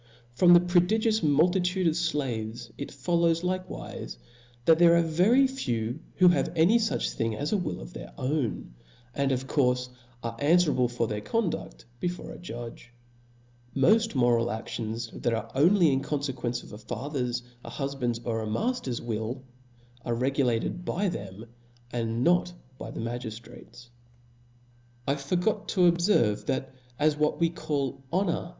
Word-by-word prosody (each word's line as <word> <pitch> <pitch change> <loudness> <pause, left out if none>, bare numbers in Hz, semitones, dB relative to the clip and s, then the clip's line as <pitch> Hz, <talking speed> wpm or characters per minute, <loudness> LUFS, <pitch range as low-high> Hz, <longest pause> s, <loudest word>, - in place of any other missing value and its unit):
From 175 +8 +6
the - - +9
prodigious 200 +6 +2
multitude 180 +4 +2
of 165 - +4
flaves 125 -9 -2
it 140 - -6
follows, 165 +4 +1
• - - -16 0.2
Hkewife, - - -7 0.5
that 160 0 +6
there 170 -1 +7
are 170 - +4
very 185 +12 +4
few 120 - -2 0.2
who 180 -1 +6
have 175 - +1
any 175 +9 +5
fuch 220 0 -1
thing 115 -1 -1
as 145 - -2
a - - +3
will 180 - -3
of - - -10
their - - -9
own, 130 - -2 0.4
and 140 0 0
of 130 0 -1
courfe 125 -2 +1 0.3
are 115 -1 -3
anfwerable 145 -4 +3
for 120 -1 -1
their 105 -1 -3
condudl 210 - -2
before 180 0 -4
a - - -10
judge^ 120 -8 -8 0.9
Moft 215 +9 +3
moral 120 -2 +3
aftions, 115 0 -5
that 120 - +1
are 115 0 -5
only 170 +2 +4
in 135 - +1
confequence 135 -4 -3
of - - -13
a 105 - -8
father's, 125 +1 -3 0.2
a - - -8
hufband'^, 135 -4 -2
or 115 -2 -1
a 110 - -4
mafter's 135 - -2
will, 115 +3 -3 0.6
are 120 - -1
re 130 +3 +1
gulated 130 +4 0
by 190 +3 0
them, 100 - -7 0.5
and 115 0 -1
not 175 +2 +3 0.3
by - - -6
the - - -7
magiftrates. 120 +1 -7 1.2
I 140 - +3
forgot 180 +9 -1
to 190 - +1
obferve, 170 - +3
that 130 0 -2 0.2
as 150 +2 +3
what 150 0 +1
we 165 -1 +2
call 140 -6 -3
honor. 185 0 0
140 Hz, 155 wpm, -28 LUFS, 120-175 Hz, 1.2 s, the